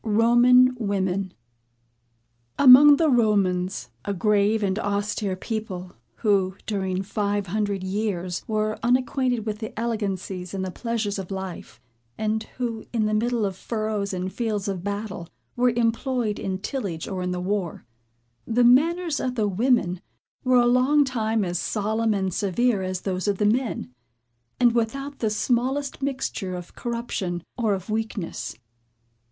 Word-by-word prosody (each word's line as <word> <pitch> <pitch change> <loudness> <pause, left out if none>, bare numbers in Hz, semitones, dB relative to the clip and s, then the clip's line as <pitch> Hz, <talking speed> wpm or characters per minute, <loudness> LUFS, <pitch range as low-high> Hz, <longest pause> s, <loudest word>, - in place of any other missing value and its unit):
ROMAN 240 +3 +5
WOMEN. 195 -3 -1 1.3
Among 285 +2 +9
the 320 +2 +2
Romans, 190 - +1
a 200 - -2
grave 210 +2 +2
and 195 +1 0
austere 205 -1 -1
people, 190 -3 -5 0.2
who, 195 -4 +1
during 190 -3 -2
five 205 0 -1
hundred 200 0 -2
years, 185 -3 -2
were 215 0 -1
unacquainted 250 -1 +1
with 210 -1 -3
the 220 -1 -6
elegancies 195 -5 -3
and 190 -1 -2
the 185 - -4
pleasures 220 -1 -2
of 190 - -6
life, 190 -7 -6 0.4
and 220 0 0 0.2
who, 230 -3 -3
in 225 -3 +1
the 215 - 0
middle 230 0 +1
of 195 -2 -3
furrows 215 -1 -2
and 185 0 -3
fields 215 -3 -2
of 190 -3 -3
battle, 200 -4 -4 0.3
were 250 0 +3
employed 235 -1 0
in 190 -1 -2
tillage 195 - -4
or 190 -2 -4
in 180 0 -2
war, 195 -4 -2 0.6
the 240 +2 +2
manners 315 +6 +4
of 255 -1 -2
the 215 -3 +1
women 200 -3 +1 0.4
were 255 -1 +4
a 240 - +5
long 255 +4 +4
time 225 -4 0
as 175 -1 -2
solemn 220 +1 0
and 190 -2 -1
severe 205 +3 +1
as 185 -1 -3
those 185 0 -2
of 200 -1 +1
the 210 - +1
men, 225 - 0 0.7
and 240 -2 +5
without 275 +5 -2
the 220 - +1
smallest 255 +6 -1
mixture 255 -8 -3
of 175 -1 -8
corruption, 215 -7 -3
or 225 -5 +1
of 190 +3 -7
weakness. 215 - -3
215 Hz, 145 wpm, -24 LUFS, 190-240 Hz, 1.3 s, Among